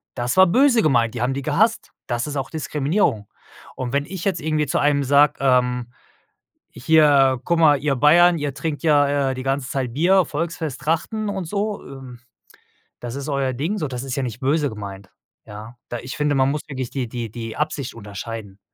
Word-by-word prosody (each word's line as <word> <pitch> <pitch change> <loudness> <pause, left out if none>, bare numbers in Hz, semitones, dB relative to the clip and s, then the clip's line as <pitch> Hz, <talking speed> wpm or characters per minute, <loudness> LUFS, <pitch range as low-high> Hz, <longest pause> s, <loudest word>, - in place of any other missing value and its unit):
Das 120 -1 -2
war 190 - +7
böse 245 +5 +4
gemeint, 120 -6 +2
die 120 - -4
haben 125 +2 0
die 140 - -4
gehasst. 200 - +1 0.2
Das 120 +3 -2
ist 145 - -5
auch 135 -2 -3
Diskriminierung. 150 - -1 0.5
Und 130 0 -5
wenn 140 0 +1
ich 185 0 -7
jetzt 195 - 0
irgendwie 155 0 0
zu - - 0
einem 145 -1 +2
sage, 145 +2 +4
ähm: 125 -2 +1 0.8
„Hier, 140 -3 +4
guck 170 -1 +1
mal, 150 -3 +5
ihr 140 0 0
Bayern, 170 +6 +5
ihr 145 -2 -3
trinkt 155 -1 -4
ja, 145 -3 +2
äh, - - -2
die 130 - -6
ganze 135 -1 -2
Zeit 130 -4 -2
Bier, 180 +6 +3
Volksfest, 155 -2 -4
Trachten 165 +8 -1
und 195 -2 -3
so, 205 +4 -3
ähm, 130 -3 -11 0.8
das 120 -1 -6
ist 140 +2 -5
euer 135 -2 -1
Ding 160 - -2
so“, 155 -7 -2
das 125 -2 -5
ist 135 -1 -4
ja 135 - -2
nicht 120 -2 -5
böse 145 +2 +1
gemeint, 100 -2 -9 0.4
ja? 105 +3 -10
Da 120 - -4
ich 130 +2 -7
finde, 150 -1 +1
man 135 0 +3
muss 150 +1 -3
wirklich 130 -4 -5
die 130 -3 -3
die 115 -2 -6
die 115 -1 -6
Absicht 150 -3 -3
unterscheiden. 105 -1 -8
140 Hz, 200 wpm, -21 LUFS, 125-155 Hz, 0.8 s, war